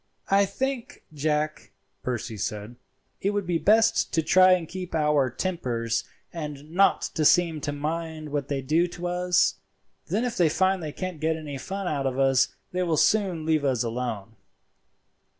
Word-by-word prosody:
"I 200 +1 +5
think, 260 +5 -4
Jack," 150 +1 -1 0.3
Percy 120 -2 -3
said, 105 +3 -4 0.5
"it 195 - +1
will 205 - 0
be 175 -2 -1
best 220 +4 +3
to 160 - +2
try 185 +3 +6
and 175 -3 0
keep 180 -1 -6
our 150 -4 +2
tempers 120 -8 -2 0.3
and 150 -2 -7
not 195 +3 +3
to 155 - 0
seem 165 -1 +4
to 145 - -2
mind 155 +1 -4
what 145 -2 -2
they 140 -2 -2
do 160 +6 +2
to 175 0 -8
us; 180 0 +2 0.5
then 215 +8 0
if 240 -1 -2
they 170 -3 +4
find 190 +3 +1
they 155 -2 -4
can't 185 0 -5
get 160 +1 +1
any 145 -3 -6
fun 195 +6 -4
out 140 -4 -1
of 130 -1 -3
us 135 -1 +4 0.2
they 180 - -1
will 170 -3 +1
soon 185 -6 +2
leave 155 -2 +2
us 130 -5 +1
alone." 115 -3 -4
160 Hz, 170 wpm, -26 LUFS, 140-180 Hz, 0.5 s, try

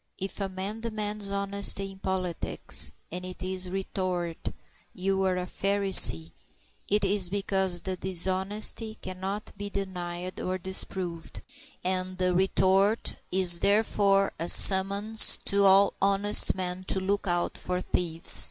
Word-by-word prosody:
If 195 +2 -6
a 195 - -3
man 190 +4 -7
demands 210 -2 -1
honesty 200 0 0
in 190 - -16
politics, 185 -3 +1 0.2
and 180 +2 -6
it 185 0 -9
is 185 0 -4
retorted, 185 -3 -5 0.4
"You're 190 0 -1
a 180 - -4
Pharisee," 190 - +5 0.6
it 210 0 0
is 195 -2 +1
because 190 -2 -1
the 190 -1 -4
dishonesty 190 +5 0
cannot 190 +3 -7
be 205 +1 -7
denied 180 -2 -6
or 185 0 -4
disproved, 185 -2 -5 0.4
and 185 0 -3
the 180 -1 -1
retort 190 +3 +1 0.2
is 180 -2 +4
therefore 200 -1 +1
a 170 +1 -4
summons 200 +3 +4
to 200 0 +2
all 195 +1 +4
honest 200 +1 +3
men 185 0 -4
to 190 - -3
look 200 +2 -3
out 175 -1 -1
for 180 0 -4
thieves. 165 -2 0
190 Hz, 130 wpm, -26 LUFS, 185-200 Hz, 0.6 s, Pharisee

